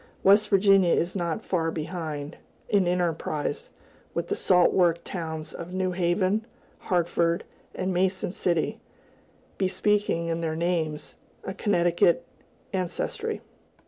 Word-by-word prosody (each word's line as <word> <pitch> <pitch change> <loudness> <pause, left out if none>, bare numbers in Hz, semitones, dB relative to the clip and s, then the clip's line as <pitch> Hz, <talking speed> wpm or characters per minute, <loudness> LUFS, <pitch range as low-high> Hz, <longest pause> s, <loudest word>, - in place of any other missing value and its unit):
West 205 +2 +6
Virginia 195 -2 +5
is 175 +3 +1
not 175 +3 -2
far 165 -3 0
behind, 155 -2 -5 0.3
in 200 -4 +3
enterprise, 165 -4 -1 0.5
with - - -2
the - - +1
salt 180 -2 +4
work 175 -2 +4
towns 160 -3 -5
of 175 +2 -7
New 185 0 0
Haven, 185 +4 +1 0.4
Hartford, 170 -1 +1 0.3
and 185 0 -1
Mason 185 0 +1
City, 170 -3 0 0.8
bespeaking, 195 -2 +1
in 165 0 -1
their 160 -1 -1
names, 160 -3 -1 0.3
a 190 - -4
Connecticut 175 -4 +2 0.5
ancestry. 185 -2 -2
175 Hz, 115 wpm, -26 LUFS, 165-190 Hz, 0.8 s, West